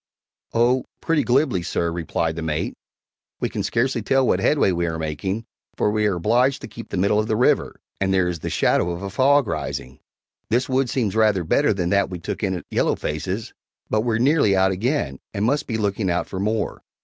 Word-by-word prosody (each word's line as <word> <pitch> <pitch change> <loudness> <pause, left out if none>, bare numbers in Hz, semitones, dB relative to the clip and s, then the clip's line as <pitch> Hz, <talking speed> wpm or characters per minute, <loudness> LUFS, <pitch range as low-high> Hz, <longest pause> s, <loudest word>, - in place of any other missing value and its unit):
"Oh, 125 +3 +2
pretty 165 -2 +1
glibly, 125 - +2
sir," 85 0 -1
replied 80 -1 -2
the 85 - -4
mate; 75 -1 -2 0.7
"we - - -1
can - - -3
scarcely 120 +1 0
tell 135 +4 +2
what - - +2
headway 145 -10 +3
we 85 -1 0
are 80 -1 -2
making, 80 +8 -3 0.3
for 105 - +2
we 105 0 +1
are 100 - +1
obliged 125 +9 +2
to - - -7
keep 115 - -10
the - - -3
middle 100 +3 +3
of 110 - 0
the 110 - +1
river, 125 - +2 0.2
and 95 0 +1
there 95 -2 +3
is 85 -2 -3
the - - -4
shadow 85 - +2
of 85 +2 -4
a 100 - -4
fog 140 +5 +4
rising. 75 - -4 0.5
This 125 +5 +1
wood 130 -1 +1
seems 110 -6 -1
rather 105 -5 +3
better 145 - +2
than 90 -4 -1
that 100 -1 +2
we 90 - -5
took 85 - -5
in 95 -3 0
at 90 - -7
Yellow - - +2
Face's, 95 +8 -4 0.4
but 110 - +2
we're 115 -1 0
nearly 130 -5 +3
out 95 0 +3
again, 95 - -1 0.2
and 100 +1 0
must 145 +5 +1
be 115 - -1
looking 100 -2 -1
out 85 -1 0
for 95 - -6
more. 105 +2 -1
105 Hz, 215 wpm, -22 LUFS, 90-120 Hz, 0.7 s, fog